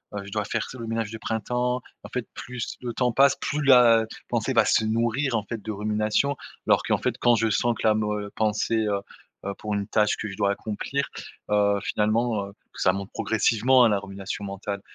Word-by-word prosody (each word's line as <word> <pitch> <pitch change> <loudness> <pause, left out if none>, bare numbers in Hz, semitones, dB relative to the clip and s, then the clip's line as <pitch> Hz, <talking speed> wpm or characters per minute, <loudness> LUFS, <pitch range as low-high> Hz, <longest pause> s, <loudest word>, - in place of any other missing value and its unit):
heu, 100 - -4
je 100 - -10
dois 105 0 -1
faire - - -2
ce 130 - -9
le 115 - -6
ménage 115 -1 -2
de 115 - -6
printemps. 125 +3 -1 0.2
En - - -9
fait 125 -2 -4
plus 125 -2 -6
le 120 -2 -4
temps 125 0 +1
passe, 135 +3 +5
plus 150 +1 -2
la 120 -4 +6 0.2
pensée - - 0
va - - +5
se 110 - +3
nourrir 115 +4 0
en 110 - 0
fait 110 +2 -6
de 110 - -5
rumination, 105 +6 0 0.3
alors - - +4
qu'en - - +1
fait 125 -1 -1
quand 120 -1 +4
je 115 0 +1
sens 120 +3 +1
que - - -4
la 110 - +4
mo 105 -1 0
heu, 105 0 -7
pensée, 110 +1 +1
heu 100 -1 0 0.4
heu, 100 - -2
pour 105 -1 -4
une 100 -1 -2
tâche 105 -1 +2
que 110 - -4
je 95 - -8
dois 100 -1 +2
accomplir, 110 +7 -3 0.4
heu, 100 -1 +3
finalement, 110 0 0
heu, - - -14 0.2
ça 90 - +2
monte 100 +1 -5
progressivement, 115 +3 +3
hein, - - +5
la 100 -2 +2
rumination 100 +1 -6
mentale, 100 0 -5
110 Hz, 220 wpm, -25 LUFS, 105-120 Hz, 0.4 s, la